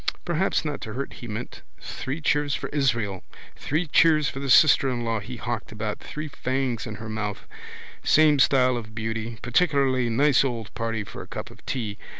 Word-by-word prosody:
Perhaps 175 0 0
not 150 -2 -3
to 110 -3 -6
hurt 135 +3 -4
he 120 - -9
meant. 110 +3 -6 0.2
Three 140 +5 -5
cheers 145 -2 +1
for - - -5
Israel. 115 -10 0 0.3
Three 155 +5 -1
cheers 155 -1 +4
for 135 - -4
the 140 0 -4
sister 135 0 +6
in 120 -2 -2
law 115 -1 0
he 120 +5 -7
hawked 120 0 -4
about, 110 -1 -4
three 155 +1 -6
fangs 130 -5 -2
in 110 - -5
her 110 +1 -8
mouth. 110 -2 -4 0.6
Same 150 -2 +5
style 130 -2 +4
of 110 -1 -8
beauty. 110 0 -3
Particularly 130 -2 +2
nice 140 +5 +4
old 115 -5 -3
party 115 -1 -2
for - - -9
a - - -11
cup - - -7
of - - -17
tea. 110 -6 -3
125 Hz, 185 wpm, -25 LUFS, 110-140 Hz, 0.6 s, sister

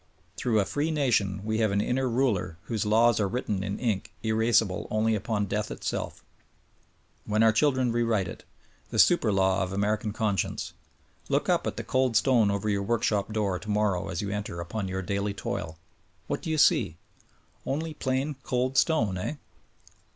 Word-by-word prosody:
Through 115 -3 +1
a 100 - +2
free 145 +8 -1
nation 110 -10 +1
we 110 0 0
have 110 -1 +3
an 100 - +1
inner 130 +4 0
ruler 115 -9 0
whose 110 -3 -2
laws 115 +2 +4
are 100 - +2
written 105 -4 -2
in 100 0 -3
ink 110 -6 -2
erasible 110 -3 +2
only 110 +1 +1
upon 105 0 -1
death 105 +2 -2
itself - - -4 0.5
— - - -24
^when 110 +1 +3
our 110 - +6
children 130 0 +2
rewrite 115 -5 +1
it: - - -9 0.5
The - - -4
super 175 -11 +5
law 95 -1 +2
of 95 -1 -2
American 105 +2 0
conscience. 105 -3 -2 0.6
Look - - +1
up - - +2
at - - -3
the - - -3
cold 130 -3 +2
stone 115 -3 +4
over 100 +1 -1
your 100 -1 +1
workshop 105 -1 0
door 100 -4 -1
tomorrow 105 -3 0
as 85 +2 -3
you 100 - -3
enter 105 -4 -4
upon 95 +4 -4
your 95 +1 -3
daily 100 +2 -2
toil. 80 -4 -4 0.5
What - - -3
do - - -5
you 160 - 0
see? 145 - +3 0.7
Only 155 +3 -2
plain, 135 0 -2
cold 130 +1 -1
stone, 110 - +1
eh? 120 - -3
110 Hz, 175 wpm, -27 LUFS, 100-120 Hz, 0.7 s, our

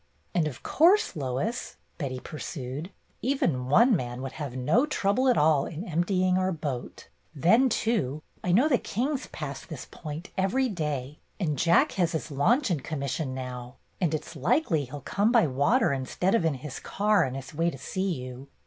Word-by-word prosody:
"And 160 -3 +2
of 135 -5 -7
course, 360 - +4
Lois," 145 - -3 0.2
Betty 130 -4 -3
pursued, 145 +1 -6 0.3
"even 170 - 0
one 235 - +6
man 125 -4 -4
would 135 - -4
have 145 -5 -6
no 160 - +2
trouble 250 -1 +1
at 250 - +4
all 150 -2 +4
in 170 +6 -6
emptying 185 +2 +1
our 185 0 +1
boat. 145 -7 -5 0.3
Then, 225 - +4
too, 155 - 0 0.2
I 180 - +1
know 240 +12 +5
the 255 -6 +3
Kings 265 +6 -2
pass - - -6
this - - -8
point 155 +3 -8
every 225 +8 +1
day. 150 - -3 0.2
And 155 -7 0
Jack 165 +5 +4
has 175 -3 +1
his 160 -1 -3
launch 225 - +2
in 165 - +1
commission 140 -1 -3
now, 125 -1 -6 0.3
and 160 -3 +2
it 155 - -4
's - - -11
likely 155 - +1
he 130 - -17
'll 145 0 -6
come 205 - +1
by 235 -7 +5
water 145 - +2
instead 140 +8 -1
of 205 -8 +3
in 160 -3 +2
his 130 +1 -7
car 205 -2 +2
on 130 -2 -3
his 135 +1 -7
way 165 +3 +1
to 135 - -7
see 190 +7 -2
you. 130 -2 -6
160 Hz, 185 wpm, -27 LUFS, 135-200 Hz, 0.3 s, one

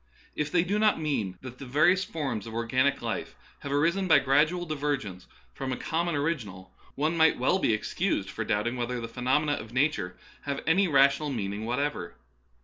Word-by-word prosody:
If 150 -1 -2
they 175 -1 +3
do 200 +4 0
not 215 -4 +3
mean 125 -12 -2
that 130 -1 -9
the 140 - -7
various 165 +8 +4
forms 140 - -4
of 110 - -7
organic 130 +4 +1
life - - -4 0.2
have 140 - -6
arisen 170 +7 +1
by 165 - +7
grad 140 +4 +4
ual 175 0 -4
divergence 140 - -3 0.3
from 130 - -4
a 125 - -2
common 170 +1 -1
original, 105 - -3 0.2
one 155 +4 0
might 160 -1 +4
well 130 +9 +2
be - - +2
excused 110 - -1
for - - -3
doubting 120 +4 -1
whether 120 0 -2
the 115 - -5
phenomena 130 +6 0
of 115 -5 -4
nature 120 -10 0 0.3
have 140 -1 -3
any 185 +4 +3
rational 140 0 +4
meaning 105 -4 -3
whatever. 125 -8 -2
140 Hz, 185 wpm, -28 LUFS, 115-160 Hz, 0.3 s, by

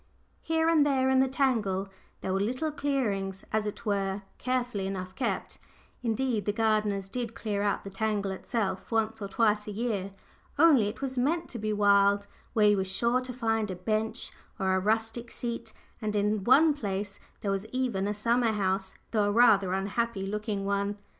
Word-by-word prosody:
Here 320 0 +1
and 325 -3 +5
there 265 -2 +2
in 260 - +4
the 265 - +4
tangle 225 -8 +1 0.3
there 185 - -2
were 195 - +1
little 255 +10 -1
clearings, 215 -10 -1
as 215 -1 +1
it 210 - -6
were, 200 -1 -1 0.2
carefully 245 -6 -1
enough 185 -1 -5
kept 240 +2 -3 0.4
indeed, 235 -2 0
the 205 - +2
gardeners 210 -3 +1
did 230 +2 -4
clear 205 -2 -2
out 205 -1 0
the 195 - -8
tangle 205 -1 -1
itself 195 0 -3
once 225 0 0
or 200 - -3
twice 210 +1 +1
a - - -3
year, 205 -3 -2 0.5
only 285 -9 +6
it 210 - -6
was 260 -1 -2
meant 325 +7 0
to 235 - -6
be 215 0 -1
wild 200 -1 +4 0.3
where 210 -2 +5
you 205 - +4
were 190 - +1
sure 235 +7 +1
to 255 0 -6
find 225 -3 0
a 185 - -3
bench, 215 +4 -2 0.3
or 190 -2 +1
a 190 - +3
rustic 225 +4 -1
seat, 235 -2 -5 0.3
and 210 -1 -2
in 210 0 +1
one 300 +5 +6
place 200 -6 -4 0.2
there 200 - -1
was 195 +2 -2
even 235 -6 -1
a 205 - 0
summer 230 +2 +2
house, 190 -1 -1 0.2
though 215 -3 +2
a 205 - +1
rather 205 -4 +5
unhappy 195 +2 -1
looking 210 0 -3
one. 200 +1 -1
215 Hz, 185 wpm, -29 LUFS, 200-240 Hz, 0.5 s, only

